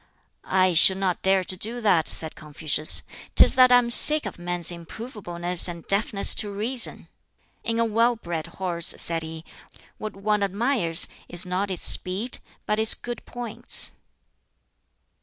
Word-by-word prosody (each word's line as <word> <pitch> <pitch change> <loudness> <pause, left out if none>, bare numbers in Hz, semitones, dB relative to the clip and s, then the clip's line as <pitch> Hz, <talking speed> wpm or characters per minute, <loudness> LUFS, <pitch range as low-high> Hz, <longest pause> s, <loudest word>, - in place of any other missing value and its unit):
"I 185 -1 +1
should 190 +3 +5
not 190 -2 -3
dare 190 0 +1
do 210 +7 -3
that," 180 -8 +1
said 160 -1 -3
Confucius. 155 0 -1 0.3
"Tis - - +7
that 255 -1 +4
I 245 - +7
am 240 -1 -1
sick 300 +5 +7
of - - -8
men's 175 -1 +1
immovableness 175 -1 -5
and 170 -2 -9
deafness 200 0 +1
to 205 - -7
reason." 225 +5 -2 0.6
"In 230 0 -3
a 230 - +1
well 230 +2 0
bred 170 -7 -7
horse," 175 -3 0
said 165 -1 +3
he, 160 0 -9 0.5
"what 215 -2 -8
one 210 +1 -2
admires 200 -4 -1 0.2
is 175 +1 +1
not 185 +2 -3
its 185 -3 -2
speed, 195 +7 +1 0.3
but 210 +1 -2
its 220 0 +5
good 240 -1 -9
points." 240 -3 -2
195 Hz, 150 wpm, -23 LUFS, 175-225 Hz, 0.6 s, Tis